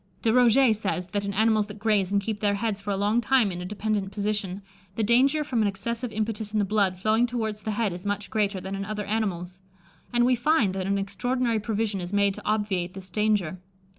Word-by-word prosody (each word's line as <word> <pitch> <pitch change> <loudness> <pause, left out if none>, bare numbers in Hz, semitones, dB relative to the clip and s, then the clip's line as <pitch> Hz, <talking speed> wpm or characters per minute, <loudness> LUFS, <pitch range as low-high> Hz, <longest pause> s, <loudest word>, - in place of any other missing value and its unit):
De 225 - +3
Roget 250 0 +5
says, 190 -3 -2
that 200 +2 -2
in 200 - -2
animals 215 +1 +2
that 205 0 -9
graze 205 -3 +1
and 200 0 +2
keep 215 0 -3
their 205 -1 +1
heads 205 -1 -2
for 200 - -6
a 200 - 0
long 210 +4 +2
time 240 -3 +3
in 175 0 -5
a - - -5
dependent 205 0 -2
position, 200 -1 -2 0.3
the 225 - 0
danger 265 +7 +3
from 250 -6 0
an 210 - +3
excessive 230 +5 -3
impetus 215 0 -3
in - - +1
the 205 - +2
blood 195 -2 +1
flowing 220 +5 +2
towards 220 -3 -3
the 220 - -4
head 215 -3 0
is 175 +1 -7
much 205 0 -3
greater 205 -3 0
than 190 +1 -6
in 195 0 -3
other 210 0 -4
animals; 190 -4 -2 0.5
and 240 0 +3
we 255 - +4
find 245 -5 +2
that 190 -1 -3
an 200 0 +1
extraordinary 230 +4 -1
provision 215 -2 -2
is 175 +1 -6
made 200 -1 +2
to - - -10
obviate 200 -4 -1
this 190 -1 -8
danger. 205 -5 0
210 Hz, 225 wpm, -26 LUFS, 195-225 Hz, 0.5 s, Roget